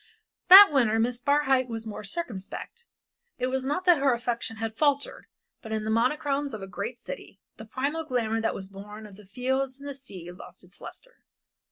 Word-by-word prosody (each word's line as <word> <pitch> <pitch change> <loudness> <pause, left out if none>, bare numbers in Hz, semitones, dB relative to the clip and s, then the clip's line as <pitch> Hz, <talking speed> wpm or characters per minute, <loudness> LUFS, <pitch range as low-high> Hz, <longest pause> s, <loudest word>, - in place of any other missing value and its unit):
That 390 0 +11
winter 230 -5 +3
Miss 240 +2 0
Barhyte 270 -2 +2
was 225 -1 -5
more 215 -1 -7
circumspect. 250 - -6 0.5
It 255 +1 -1
was 265 0 -1
not 295 +7 -2
that 350 -4 +6
her 275 -2 +3
affection 235 -1 -3
had 225 0 -4
faltered, 285 +1 0 0.3
but 220 - -9
in 220 -1 -1
the 220 - -1
monochromes 275 +3 0
of 205 - -8
a - - -6
great 235 +5 -5
city 200 -4 -9 0.2
the 220 - -9
primal 280 +8 -2
glamour 230 -6 -1
that 225 - -1
was 190 - -7
born 210 +2 -10
of 205 -2 -12
the 205 -1 -16
fields 260 +5 -2
and 285 - -9
of 280 - -5
the - - -12
sea 180 -9 -9
lost 180 +1 -13
its 180 +2 -13
lustre. - - -12
245 Hz, 200 wpm, -27 LUFS, 215-280 Hz, 0.5 s, That